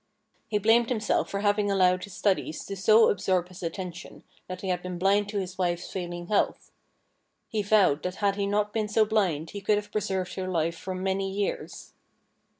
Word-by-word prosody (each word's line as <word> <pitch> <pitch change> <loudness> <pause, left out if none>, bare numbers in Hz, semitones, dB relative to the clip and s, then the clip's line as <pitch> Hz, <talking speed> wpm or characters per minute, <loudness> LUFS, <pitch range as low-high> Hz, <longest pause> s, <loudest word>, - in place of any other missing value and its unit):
He 210 - 0
blamed 225 +3 +4
himself 220 -4 0
for 200 - -3
having 205 0 +2
allowed 185 -1 +3
his 200 - -13
studies 190 -6 0
to 200 - -5
so 215 +4 +5
absorb 185 -2 0
his 185 - -12
attention 175 0 -6 0.2
that 185 0 -6
he 190 - -4
had 180 -1 0
been 180 -1 -5
blind 200 +3 +2
to 205 - -3
his 190 -1 -4
wife's 175 -1 -1
failing 175 -2 -4
health. 205 +3 0 0.8
He 215 - -1
vowed 200 -8 +3
that 180 0 -3
had 200 -1 +1
he 200 0 -1
not 210 +1 0
been 215 -2 0
so 215 +1 +3
blind 185 -8 0
he 200 - -6
could 205 +1 +2
have 205 0 -5
preserved 190 -3 -2
her 185 -1 -4
life 165 -2 0
for 185 +2 -6
many 190 +1 -1
years. 200 +1 -4
195 Hz, 195 wpm, -27 LUFS, 180-205 Hz, 0.8 s, so